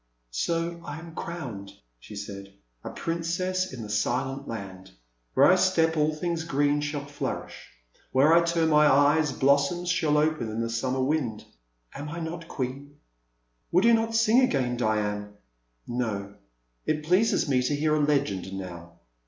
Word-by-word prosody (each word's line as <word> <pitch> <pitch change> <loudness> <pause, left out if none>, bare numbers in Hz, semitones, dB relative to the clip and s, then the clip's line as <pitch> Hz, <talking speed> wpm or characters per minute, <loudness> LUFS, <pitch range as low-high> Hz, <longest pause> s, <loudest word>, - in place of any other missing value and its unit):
So 170 - -2
I 155 - -6
am 165 0 -10
crowned, 130 - -6 0.3
she 105 - -11
said, 100 -1 -8 0.3
a - - -5
princess 175 +3 -2
in 125 -4 -7
the 105 - -8
Silent 130 +6 -1
Land. 95 -4 -7 0.5
Where 135 - +6
I 180 - +7
step, 170 -3 +2
all 155 0 +2
things 170 0 -2
green 145 -2 +1
shall 145 -1 -3
flourish; 145 0 -6 0.4
where 140 +5 +5
I 170 - +7
turn 170 -1 +1
my 150 -1 +5
eyes, 145 +2 +4
blossoms 140 +7 +2
shall 155 -4 +2
open 155 -6 +1
in 110 +1 -4
the 115 0 -2
summer 130 +3 -1
wind; 130 -7 -1 0.2
— - - -31
am 145 +1 -6
I 170 +3 -5
not 165 0 -5
queen? 140 +1 -5 0.8
Will 180 +5 +4
you 235 - +6
not 225 0 +1
sing 225 +2 +5
again, 130 - +1
Diane? 105 -3 -1 0.5
No, 105 -5 -3 0.5
it 155 -1 0
pleases 185 +5 +2
me 130 -3 +2
to 130 +4 0
hear 150 +1 +1
a 155 - +2
legend 140 -11 0
now. 85 -3 -8
145 Hz, 160 wpm, -27 LUFS, 115-165 Hz, 0.8 s, I